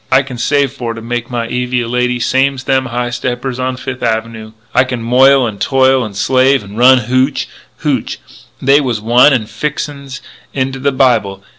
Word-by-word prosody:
I 130 +2 +4
can 130 -3 -9
save 140 +2 +1
for 120 -4 -5
to 115 - -8
make 120 0 -4
my 120 -2 -3
Evie 125 +1 -1
a 115 - -4
lady 125 +1 -1
same's 130 +2 0
them 130 0 0
high 120 0 -3
steppers 125 +1 -4
on 130 0 -2
Fifth 130 0 -6
Avenoo. 110 -1 -3 0.2
I 125 - +4
can 125 -3 -5
moil 130 +2 +4
and 105 -4 -6
toil 130 -1 +2
and 105 -3 -7
slave 130 +2 +2
an' 100 +1 -11
run 125 +2 +5
hootch 130 +4 0 0.4
hootch - - -1 0.4
They 140 +2 +4
wuz 125 -4 -1
wine 120 +6 +4
'n' 125 -5 +1
fixin's 140 +1 -5 0.4
into 135 0 -2
the 140 +2 0
Bible. 120 -8 +1
125 Hz, 185 wpm, -14 LUFS, 120-135 Hz, 0.4 s, run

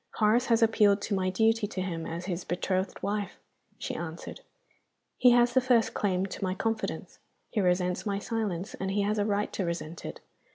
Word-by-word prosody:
"Horace 225 +4 +3
has 230 -1 +4
appealed 210 -2 +4
to 215 - -2
my 185 -1 +1
duty 220 +3 +2
to 200 - -6
him 170 -3 -3
as 170 +2 -5
his 180 -2 -3
betrothed 185 +1 -2
wife," 205 -1 -2 0.4
she - - -4
answered. - - -6 0.8
"He 250 - +7
has 240 0 +5
the 260 - +5
first 245 -3 +3
claim 190 -2 0
to 195 - -6
my 185 0 0
confidence 225 +2 -3 0.3
he 215 - +1
resents 180 0 +1
my 200 -2 -1
silence, 200 -4 -3
and 190 - -3
he 200 +1 +1
has 210 +1 0
a 205 - +2
right 205 0 0
to 195 - -1
resent 170 -1 -4
it. - - -6
200 Hz, 195 wpm, -29 LUFS, 185-220 Hz, 0.8 s, He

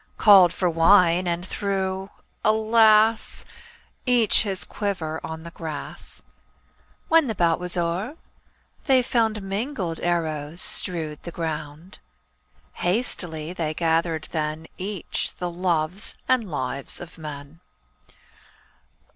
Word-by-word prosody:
Called 195 -5 +7
for 180 0 -1
wine, 175 +1 +4
and 175 +1 -2
threw 190 -1 -2 0.2
— - - -42
alas! 220 0 +3 0.3
— 465 - -31
Each 225 -3 +4
his 195 -3 -1
quiver 165 -6 -3
on 160 0 -6
the 170 - -9
grass. 160 -4 -8 0.8
When 325 -3 +4
the 220 - -2
bout 170 -3 +2
was 180 0 -2
o'er 175 - -2 0.7
they 260 -3 +4
found 225 -4 0
Mingled 195 - -3
arrows 160 -2 -2
strewed 160 -7 -1
the - - -7
ground. 160 0 -6 0.8
Hastily 175 -5 0
they 155 -3 -3
gathered 165 -1 0
then 155 0 -3
Each 195 -1 -3
the 180 -1 -4
loves 175 +1 0
and 240 -6 +1
lives 135 -2 -3
of 175 -1 -11
men. 150 0 -9
175 Hz, 115 wpm, -24 LUFS, 160-205 Hz, 0.8 s, Called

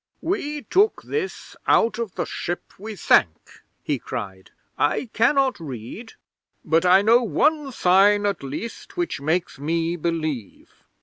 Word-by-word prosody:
'"We 300 -5 -3
took 410 +4 +2
this 430 -3 -4
out 225 0 +3
of 230 -5 -4
the - - -2
ship 175 +1 -5
we 215 +2 -7
sank," 85 - +1 0.2
he 145 -4 -1
cried. 95 -8 -7 0.3
"I 215 - 0
cannot 260 +2 +2
read, 145 - -8 0.5
but 165 +3 +2
I 190 +2 +6
know 230 +3 +5
one 285 - +1
sign, 205 0 +4
at 200 -4 -1
least, 150 - -7
which 345 - -2
makes 160 0 -1
me 165 +3 -1
believe." 155 - -4
195 Hz, 135 wpm, -23 LUFS, 155-240 Hz, 0.5 s, I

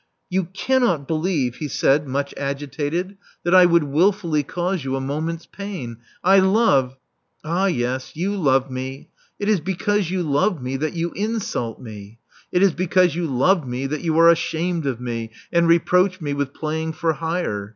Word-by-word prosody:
You 185 0 +1
cannot 190 - 0
believe," 155 -6 -1
he 150 - -4
said, 145 +1 +2
much 140 +2 -2
agitated, 145 +7 -3 0.3
that 175 - +1
I 180 -1 +8
would 170 -2 +4
wilfully 165 +2 +1
cause 175 +3 -2
you 135 0 -2
a - - -1
moment's 155 +5 -3
pain. 185 - -7 0.3
I 195 +2 +6
love 190 - +3
" 130 +3 -32
•*Ah, 175 +5 +1
yes, 130 -5 -2
you 190 +6 -1
love 135 -7 +2
me. 130 +1 -6 0.3
It 205 - -3
is 210 -3 +3
because 190 +2 -1
you 185 -1 -1
love 160 +5 +1
me 130 +1 -4
that 155 +3 -2
you 170 0 -2
insult 205 - -3
me. 105 -2 -10 0.3
It 180 +2 +3
is 195 -4 +4
because 180 -1 +2
you 170 +1 -2
love 150 +4 +2
me 125 +2 -3
that 150 +2 -3
you 160 -2 0
are 165 0 +8
ashamed 170 -1 -1
of 125 -3 -2
me 115 -2 -4 0.2
and 170 0 +4
reproach 180 +3 +3
me 145 -4 -3
with 140 -1 -2
playing 160 +2 -3
for 160 +1 0
hire. 155 - -3
160 Hz, 180 wpm, -22 LUFS, 135-180 Hz, 0.3 s, I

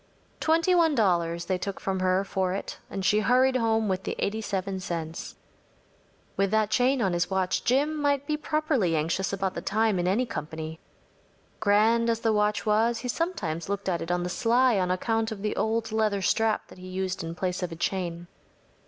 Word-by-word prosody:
Twenty 330 +3 +3
one 330 -4 +4
dollars 170 -6 +1
they 185 -1 -1
took 200 +1 -4
from 190 -1 -2
her 185 +1 +2
for 190 -2 -1
it, 195 - -5
and 195 -1 -4
she 210 - +4
hurried 255 +4 +3
home 225 -2 +1
with 190 -1 -1
the - - -4
87 200 -2 -2
cents. 165 -3 -5 1.0
With 195 0 +1
that 215 0 +1
chain 250 +2 +2
on 190 -2 +1
his 175 0 0
watch 190 -1 0
Jim 295 +4 +1
might 285 -1 +1
be 300 0 0
properly 300 - 0
anxious 165 +5 0
about 195 -1 -1
the - - -5
time 215 -2 +1
in 175 - 0
any 215 +7 +2
company. 160 -4 -6 0.8
Grand 220 +3 +3
as 230 0 0
the 225 -1 +2
watch 210 +1 +1
was, 225 +2 +2
he 250 - -5
sometimes 205 - -2
looked 200 -1 -3
at 175 -3 0
it 165 - -5
on 175 0 0
the 180 - -2
sly 240 +2 +3
on 180 -1 0
account 225 +5 0
of 205 -2 -6
the 210 - -1
old 225 0 -1
leather 215 -3 +1
strap 220 +3 +1
that - - -14
he 185 - -9
used 185 0 -3
in 165 0 -5
place 180 +1 -2
of 180 -1 -3
a - - -5
chain. 175 -1 -2
200 Hz, 195 wpm, -27 LUFS, 185-230 Hz, 1.0 s, one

